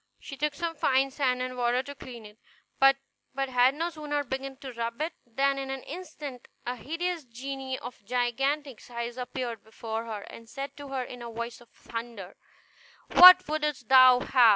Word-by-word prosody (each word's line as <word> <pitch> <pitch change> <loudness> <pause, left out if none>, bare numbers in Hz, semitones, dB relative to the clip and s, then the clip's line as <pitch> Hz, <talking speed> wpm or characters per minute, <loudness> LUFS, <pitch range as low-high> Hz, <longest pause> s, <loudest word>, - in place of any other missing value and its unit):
She 275 - -9
took 295 +1 -1
some 335 +1 -2
fine 270 -2 +2
sand 255 -2 0
and 255 0 -4
water 245 +1 +1
to 285 +1 -8
clean 245 -5 -10
it; 210 +1 -14 0.4
but 270 0 +6 0.5
had 250 +1 +4
no 335 +3 -2
sooner 295 -2 -2
begun 270 +1 -5
to 270 -2 -8
rub 230 0 -4
it 315 +2 -2
than 275 +4 +1
in 270 0 -5
an 270 -1 -4
instant 295 -6 -8 0.2
a 245 +1 -2
hideous 330 +5 -3
genie 260 +2 -5
of 245 -2 -10
gigantic 250 +4 -1
size 235 0 -5
appeared 250 -2 -5
before 225 +1 -5
her, 215 -3 -5
and 230 +2 -12
said 275 +3 -6
to 285 -1 -8
her 270 -2 -2
in 245 0 -9
a 235 - -6
voice 235 +1 -6
of 240 - -18
thunder, 230 -5 -8 0.8
"What 365 0 +10
wouldst 300 -5 -2
thou 255 -1 +8
have? - - -7
260 Hz, 180 wpm, -28 LUFS, 240-285 Hz, 0.8 s, What